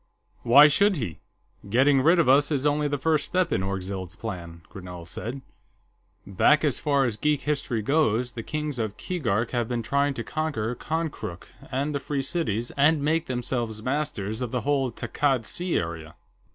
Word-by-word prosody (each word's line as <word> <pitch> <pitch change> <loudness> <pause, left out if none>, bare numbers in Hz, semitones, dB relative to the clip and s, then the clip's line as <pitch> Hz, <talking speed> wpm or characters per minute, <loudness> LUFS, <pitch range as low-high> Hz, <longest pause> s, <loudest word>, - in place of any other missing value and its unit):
"Why 140 +5 +8
should 200 +7 +3
he? 110 - -4 0.5
Getting 135 +5 +4
rid 165 +6 +5
of 170 - +3
us 145 +4 +4
is 140 -1 0
only 150 0 +2
the 145 0 -1
first 155 +2 +1
step 185 0 0
in - - +1
Orgzild's 95 -1 -4
plan," 85 -6 -7
Grinell 90 -3 -9
said. 125 +10 -6 0.8
"Back 100 +11 +3
as 145 -6 +1
far 140 -3 +2
as 115 -4 -2
geek 150 +4 +1
history 140 -7 -1
goes, 125 -3 +1
the 115 - -6
Kings 150 0 -4
of 110 -2 -3
Keegark 120 - -1
have 120 -2 -1
been 120 -2 -2
trying 140 +3 +1
to 115 - -4
conquer 145 -8 -2
Konkrook 155 - -4 0.2
and 140 +3 -1
the 140 - -1
Free 140 0 -2
Cities 120 - -2
and 145 +1 +3
make 160 +2 +1
themselves 120 -3 -3
masters 130 -6 -2
of 125 - -2
the 125 +1 -2
whole 135 -1 0
Takkad 135 -4 -1
Sea 175 +7 -1
area. 80 -2 -5
130 Hz, 175 wpm, -26 LUFS, 110-150 Hz, 0.8 s, Why